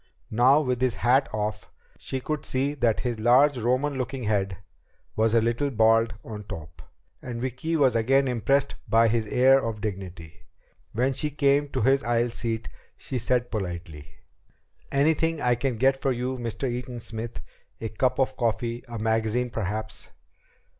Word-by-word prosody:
Now, 130 +7 +5
with 125 -4 -1
his 130 -3 +1
hat 125 +4 +3
off, 105 0 -3 0.3
she 130 - -4
could 155 +2 -3
see 135 +2 -1
that 120 -6 +1
his 120 -3 -3
large 130 +6 +5
Roman 130 +4 0
looking 130 0 -3
head 100 -3 0 0.6
was 110 +1 +2
a 115 - +5
little 120 +5 0
bald 115 -2 +3
on 105 -2 -7
top. 80 -6 -9 0.4
And 120 -2 -6
Vicki 130 +7 -2
was 135 -6 +3
again 135 +4 +3
impressed 130 +4 +1 0.2
by 115 0 +5
his 110 -1 0
air 135 +4 +4
of 115 -2 -3
dignity. 90 -5 -6 0.5
When 130 +4 +1
she 145 +3 -1
came 145 0 +2
to 130 -3 -3
his 135 +3 +4
aisle 120 +1 +1
seat, 115 -1 -3 0.3
she 130 - -4
said 125 +1 0
politely: 85 -7 -5 0.8
"Anything 160 +3 +2
I 125 -3 +2
can 120 0 -1
get 135 +3 +2
for 135 - +1
you, 125 +1 -2
Mr. 115 +2 -3
Eaton 125 0 -4
Smith? 115 -1 -5 0.4
A 110 - -4
cup 125 +4 0
of 130 -1 +1
coffee? 120 0 -1
A 120 -1 -6
magazine 110 +2 0
perhaps?" 110 +1 -4
120 Hz, 160 wpm, -26 LUFS, 110-130 Hz, 0.8 s, Now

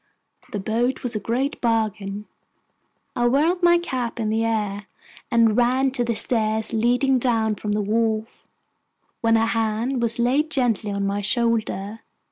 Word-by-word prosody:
The - - -3
boat 230 +6 -1
was 245 -2 -1
a - - 0
great 255 +7 -2
bargain. 210 -3 -1 0.9
I 240 0 +2
whirled 315 +8 +2
my 345 0 +5
cap 255 -9 -4
in 220 -2 -1
the 225 +1 +1
air, 210 -2 -2 0.4
and 230 -2 +3
ran 255 +3 +2
to 255 -2 0
the 235 -1 -1
stairs 220 -1 0
leading 245 +4 +2
down 225 -3 +1
from 210 0 -3
the 210 0 0
wharf, 220 +1 -2 0.7
when 225 0 +3
a 225 - +2
hand 225 +3 -1
was 230 -1 0
laid 265 +6 +1
gently 235 -8 0
on 200 0 -2
my 200 +1 -1
shoulder. 220 -1 0
230 Hz, 155 wpm, -23 LUFS, 215-245 Hz, 0.9 s, my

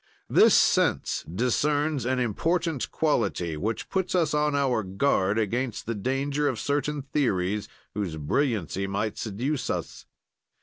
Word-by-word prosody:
"This - - +6
sense - - +2
discerns 140 - 0
an 130 0 +1
important 160 - 0
quality, 100 - 0
which 105 +8 -3
puts 190 -1 -1
us 165 -4 +2
on 150 -1 +1
our 135 -5 +2
guard 100 0 +1
against 115 +2 -1
the 115 - -2
danger 135 +7 -1
of 130 -5 -1
certain 145 0 -1
theories, 105 -8 -1 0.2
whose 95 -6 -3
brilliancy 95 - -1
might 100 +2 -2
seduce 125 +6 -2
us. - - -4
125 Hz, 130 wpm, -26 LUFS, 100-145 Hz, 0.2 s, This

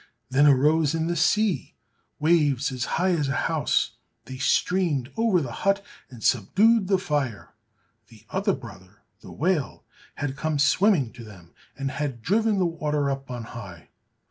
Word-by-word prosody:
Then 140 +3 +5
arose 150 +3 +3
in 160 0 -1
the 170 +1 -1
sea 200 +4 +1 0.4
waves 145 -5 +2
as 130 -1 -3
high 185 +2 +2
as 155 -5 0
a 140 - -1
house, - - 0 0.3
they 130 0 -8
streamed 150 -4 +1
over 225 -6 +2
the 125 - -5
hut, 195 0 +1 0.2
and 120 -4 -12
subdued 200 - +3
the 195 -1 +3
fire. 145 - -3 0.5
The 110 -1 -18
other 195 +1 +1
brother, 105 - -11 0.2
the - - -12
whale, 160 -4 -1 0.3
had 145 -2 -3
come 155 +1 -2
swimming 150 - +3
to 120 - -11
them, 95 -6 -14 0.2
and 135 0 -3
had 135 -5 -4
driven 215 - +2
the 185 - +2
water 150 -4 -1
up 135 0 -5
on 120 -2 -5
high. 100 -8 -10
145 Hz, 160 wpm, -25 LUFS, 130-180 Hz, 0.5 s, Then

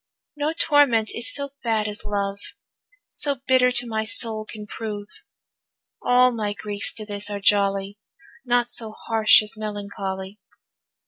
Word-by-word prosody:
No 295 +1 -1
torment 285 -9 +3
is 235 - +2
so 280 -1 -2
bad 220 -3 0
as 210 0 -5
love, 200 -1 -2 0.7
So 285 -1 +1
bitter 255 -1 +4
to 245 0 +2
my 220 -2 -2
soul 220 -1 +1
can 210 -1 -8
prove. 210 -1 -6 1.0
All 250 0 +4
my 215 -3 -2
griefs 205 0 -2
to 215 - -3
this 205 0 -2
are 205 -1 -4
jolly, 200 0 +1 0.4
Naught 245 -1 +1
so 225 -3 -3
harsh 220 -1 +4
as 210 - -4
melancholy. 200 -2 -6
215 Hz, 140 wpm, -23 LUFS, 205-240 Hz, 1.0 s, bitter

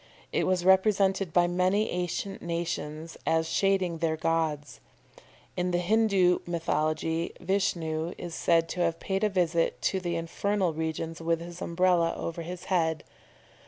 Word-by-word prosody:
It - - +1
was 185 -1 +1
represented 190 -1 +3
by 175 +1 +4
many 185 +4 +1
ancient 180 +2 -3
nations 165 -2 -4
as 160 0 +2
shading 190 -4 +1
their 160 -1 0
gods. 155 -3 -1 0.8
In 180 0 0
the 175 - +1
Hindoo 190 -1 +3
mythology 160 0 -1
Vishnu 170 -4 -1
is 175 - -7
said 165 0 +2
to 180 - -5
have 165 -1 +1
paid 195 +1 -2
a 215 - +3
visit 170 -4 +1
to 190 - +1
the 175 -2 -2
infernal 180 +2 -1
regions 160 +1 -4
with 165 0 +1
his 170 +1 -9
Umbrella 170 -1 +2
over 170 0 -4
his 175 +2 -7
head. 160 -4 0
175 Hz, 145 wpm, -28 LUFS, 165-185 Hz, 0.8 s, by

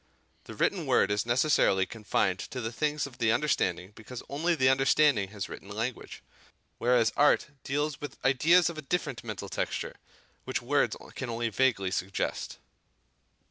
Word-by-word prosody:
The - - -9
written - - 0
word - - +3
is 105 +2 0
necessarily 120 -6 +3
confined 105 -3 -1
to 130 - -6
the 115 -2 -3
things 150 +4 -1
of 135 -3 -11
the 110 -1 +3
understanding 100 - 0
because 115 +3 -9
only 165 +5 0
the 130 -4 +3
understanding 135 -4 +3
has 100 -1 -5
written 100 - -10
language; 115 +4 -5 0.6
whereas 120 -2 +3
art 145 +1 +3
deals 145 +1 -2
with 145 -3 -7
ideas 160 +7 +5
of 170 -2 -4
a - - -5
different 145 -4 -2
mental 105 -3 -6
texture, - - -3 0.5
which - - -2
words - - +1 0.2
can 130 - -5
only 115 0 -1
vaguely 110 -5 +1
suggest. 95 +1 -3
125 Hz, 155 wpm, -29 LUFS, 105-145 Hz, 0.6 s, ideas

